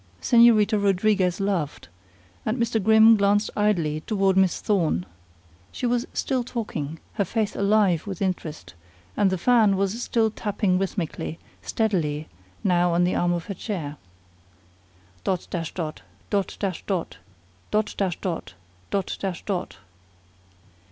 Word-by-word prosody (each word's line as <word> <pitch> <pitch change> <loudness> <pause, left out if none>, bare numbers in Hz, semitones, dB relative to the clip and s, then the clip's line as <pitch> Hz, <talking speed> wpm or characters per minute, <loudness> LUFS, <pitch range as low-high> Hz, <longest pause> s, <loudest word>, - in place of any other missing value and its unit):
Señorita 225 -3 +5
Rodriguez 195 -2 +2
laughed, 190 -7 -2 0.6
and 220 +4 -1
Mr. 230 -3 0
Grimm 220 +1 +7
glanced 205 +1 +2
idly 170 -8 +1
toward 195 -3 +2
Miss 190 -2 +3
Thorne. 165 - +1 0.7
She - - -4
was 245 +1 0
still 260 -3 -1
talking, 165 - -4 0.2
her - - +5
face 215 +2 -2
alive 200 -4 +2
with 190 -3 -5
interest; 155 - -3 0.4
and 200 - +3
the 185 - -1
fan 215 -1 +4
was 200 +4 -1
still 225 -2 +1
tapping 200 -3 0
rhythmically, 180 -4 -3 0.2
steadily, 160 -9 -1 0.4
now 175 -2 +3
on 175 - +3
the 180 - +1
arm 175 0 +1
of 175 -1 -2
her 200 - -4
chair. 165 -8 -5 1.3
"Dot 185 -2 -1
dash 165 -3 -3
dot! 160 -3 -5 0.3
Dot 200 -2 -1
dash 190 -4 -2
dot! 185 -5 -2 0.5
Dot 215 0 0
dash 190 -4 -1
dot! 170 - -4 0.3
Dot 195 -2 -1
dash 190 -3 -4
dot!" 190 -3 -3
195 Hz, 135 wpm, -25 LUFS, 175-215 Hz, 1.3 s, Grimm